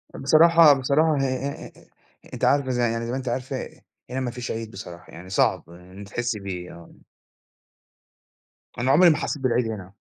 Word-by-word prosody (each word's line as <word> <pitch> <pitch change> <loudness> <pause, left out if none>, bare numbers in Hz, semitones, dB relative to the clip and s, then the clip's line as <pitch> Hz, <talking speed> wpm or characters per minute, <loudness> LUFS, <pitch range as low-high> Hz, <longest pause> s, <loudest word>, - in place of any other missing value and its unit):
بصراحة 160 +2 +6
بصراحة 140 +3 +1
آآ، 135 +2 -4 0.6
أنتِ - - -1
عارفة 140 -2 +2
ز 125 - -1
يعني 115 -1 0
زي 120 - -4
ما 130 - -2
أنتِ 130 -1 -7
عارفة 130 +2 -4 0.4
هنا 130 +1 -3
مفيش 125 -1 -4
عيد 110 0 -5
بصراحة، 90 -3 -11
يعني 90 +2 -11
صعب 95 - 0
إن 90 +2 -15
أنتِ 100 0 -10
تحسي 120 -1 -3
بيه. 90 -3 -7
آه. 85 -1 -14 1.9
أنا 130 +2 +1
عمري 175 +3 +6
ما 155 - +2
حسيت 145 -4 -4
بالعيد 120 -2 +1
هنا. 100 -3 -7
120 Hz, 165 wpm, -24 LUFS, 100-140 Hz, 1.9 s, بصراحة